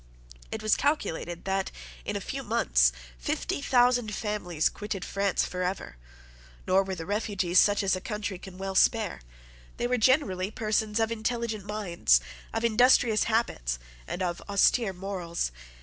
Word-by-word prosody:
It - - -4
was 215 - +4
calculated 175 - -1
that, 195 0 0 0.4
in - - -3
a - - -2
few - - -4
months, - - +3 0.3
fifty 100 - -2
thousand 245 - +3
families 195 -8 -1
quitted 205 -2 -5
France 195 -1 0
for 180 - -4
ever. 180 - -3 0.7
Nor 185 +1 +4
were 190 -1 -4
the 165 -2 -6
refugees 200 -3 +1
such 205 0 +4
as 190 -1 +2
a 185 - -5
country 210 -3 -4
can 185 -1 -11
well 195 0 -4
spare. 210 - +2 0.6
They - - -1
were 250 0 +1
generally 210 -7 +2
persons 215 0 0
of 225 0 +1
intelligent 225 -2 -2
minds, 180 - +2 0.3
of 225 - -1
industrious 235 -1 +4
habits, 140 - 0 0.3
and 185 - -3
of 175 -1 -2
austere 200 +2 +3
morals. 180 - -3
200 Hz, 150 wpm, -28 LUFS, 180-220 Hz, 0.7 s, was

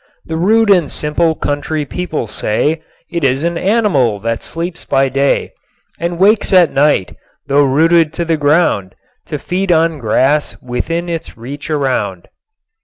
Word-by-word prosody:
The 160 - -4
rude 210 +5 +3
and 175 -7 +3
simple 160 +2 +1
country 145 +1 -2
people 170 -4 -3
say 145 +9 -1 0.3
It 170 -2 -3
is 135 +2 +1
an 170 0 0
animal 180 - +1
that 115 +1 -2
sleeps 170 +1 -5
by 135 0 +1
day 135 +2 0 0.5
And 170 0 -2
wakes 205 +4 +3
at 180 -4 +5
night, 140 -8 +2 0.3
though 140 +1 +3
rooted 160 +4 +3
to 170 - -3
the 165 -1 +1
ground, 145 - +1 0.3
To - - -3
feed 185 +1 -2
on 165 -2 +2
grass 135 +6 +1
within 165 +8 -3
its 165 -7 -5
reach 140 +7 -8
around. 125 - -2
155 Hz, 150 wpm, -15 LUFS, 135-170 Hz, 0.5 s, at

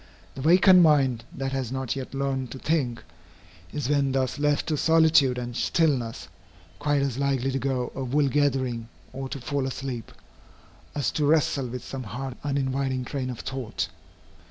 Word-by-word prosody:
The 135 - -7
vacant 180 +4 +7
mind, 135 -8 +3
that 135 0 -3
has 130 -3 -2
not 130 -1 -2
yet 135 0 -6
learned 135 -2 -1
to - - -7
think, 130 -5 -1 0.7
is 145 -4 -3
when 140 -2 +2
thus 135 +1 0
left 145 0 +2
to 155 - +1
solitude 160 -5 +4
and 120 -1 -5
stillness, 120 - 0 0.5
quite 145 -1 +1
as 135 -2 -2
likely 135 -1 +1
to 135 - -1
go 130 -2 -1
a 135 - -4
wool 140 +3 +2
gathering, 130 -5 0 0.2
or 135 0 -5
to 140 - -5
fall 135 +1 -2
asleep, 130 -3 -5 0.8
as 140 -5 0
to 150 - 0
wrestle 145 -3 +2
with 125 0 -6
some 135 - -5
hard 125 +3 -5
uninviting 135 -2 -1
train 130 -1 -3
of 125 - -5
thought. 130 -4 -3
135 Hz, 165 wpm, -26 LUFS, 125-145 Hz, 0.8 s, vacant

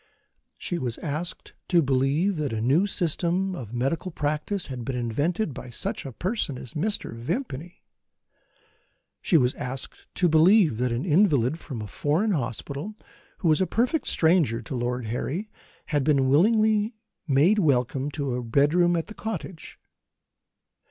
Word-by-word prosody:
She 175 - -3
was 120 -3 -3
asked 155 +3 -5
to 175 -3 +4
believe 140 +8 +1
that 145 -5 -2
a 110 - -1
new 140 - +3
system 180 +1 0
of 115 - -7
medical 135 +9 -1
practice 155 +5 -2
had 130 -3 -6
been 135 +1 -3
invented 145 - -1
by 125 - -8
such 120 - -3
a - - -6
person 180 - -2
as 125 - -9
Mr. 200 - -1
Vimpany. 160 - -5 1.4
She 170 - +4
was 125 -3 +2
asked 130 -1 -5
to 180 - +3
believe 160 - +5
that 125 -1 +1
an 120 +7 -2
invalid 155 - +3
from 125 -10 -6
a - - -6
foreign 160 - 0
hospital, 140 - -3 0.4
who 180 - -1
was 155 +2 +4
a 190 - +2
perfect 255 +7 0
stranger 160 -8 +3
to 135 - -5
Lord 125 0 -2
Harry, 160 - -3 0.4
had 145 -2 +2
been 135 -2 +3
willingly 215 - +3 0.3
made 155 +10 +4
welcome 135 - +1
to 140 -3 -3
a 125 0 -3
bedroom 150 +9 +3
at 165 - -1
the 215 - -10
cottage. 195 -6 -6
150 Hz, 150 wpm, -26 LUFS, 130-185 Hz, 1.4 s, believe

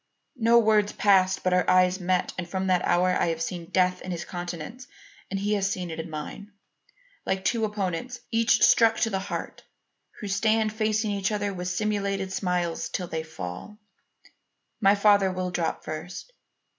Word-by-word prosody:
No 230 +1 +5
words 215 -2 +3
passed, 190 -2 +3
but 185 - +1
our 180 0 +2
eyes 185 +1 +4
met 180 0 0
and 175 -2 -5
from 190 +1 -2
that 185 -1 +2
hour 180 +1 +3
I 180 - +1
have 165 -1 -1
seen 170 0 -4
death 180 -1 +1
in - - -8
his 175 -1 -4
countenance 175 +7 -7 0.4
and 195 - -2
he 205 +2 0
has 200 -1 0
seen 180 -3 -4
it 160 - -6
in 165 +1 -5
mine, 160 +7 -7 0.7
like 190 0 -2
two 230 -2 +1
opponents, 210 +4 -3
each 230 0 +3
struck 225 -1 +5
to 225 - +1
the 190 - 0
heart, 190 - -5 0.6
who 210 - -5
stand 215 +2 +1
facing 215 -1 0
each 200 0 -1
other 205 -1 -1
with 180 -1 -5
simulated 195 0 -1
smiles 180 -3 -1
till 180 - -3
they 160 -1 -3
fall. 160 - -8 1.0
My 200 -1 +5
father 200 -2 +4
will 185 0 -3
drop 170 -2 -2
first. 165 - -7
190 Hz, 175 wpm, -26 LUFS, 180-210 Hz, 1.0 s, No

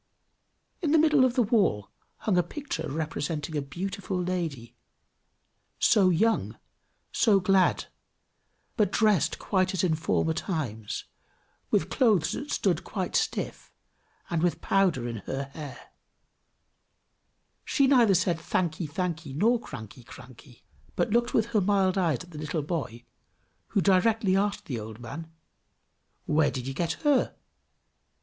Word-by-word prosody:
In 315 -4 +1
the - - +6
middle 305 -3 +5
of 255 -1 +2
the 250 - +4
wall 195 - +1 0.3
hung 210 - +1
a 180 - +5
picture 175 - -5
representing 155 +1 -3
a 145 - 0
beautiful 185 +6 -4
lady, 165 -10 -3 1.0
so 200 -5 +4
young, 220 +6 +1 0.5
so 210 -5 +4
glad, 190 0 +2 0.9
but 205 -4 +2
dressed 210 -7 +2
quite 190 -1 0
as 185 - 0
in 175 -3 +2
former 160 0 0
times, 130 - -4 0.6
with - - +1
clothes 215 - +3
that 290 - -5
stood - - 0
quite - - -4
stiff, - - -2 0.6
and 165 -2 0
with 175 0 +1
powder 180 -11 +1
in 115 -1 -4
her 135 +6 -4
hair; 150 -3 -9 1.7
she 275 - +2
neither 245 -7 +5
said 170 -1 +1
"thankee, 165 0 -1
thankee!" 160 -2 -3
nor 230 +9 +3
"cranky, 110 - -10
cranky!" 125 0 -14 0.3
but 235 - 0
looked 240 +2 +1
with 220 - +3
her 210 - +4
mild 195 -1 +2
eyes 170 -8 0
at 175 - -16
the 150 - -8
little 155 0 -2
boy, 140 -7 -4 0.6
who 200 - +1
directly 200 +1 +3
asked 205 +1 0
the 125 -5 -4
old 110 +1 -8
man, 150 +7 -8 0.9
"Where 150 -1 +3
did 125 -2 -5
you 135 - -4
get 165 +3 -1
her?" 290 -3 +2
175 Hz, 140 wpm, -27 LUFS, 145-205 Hz, 1.7 s, the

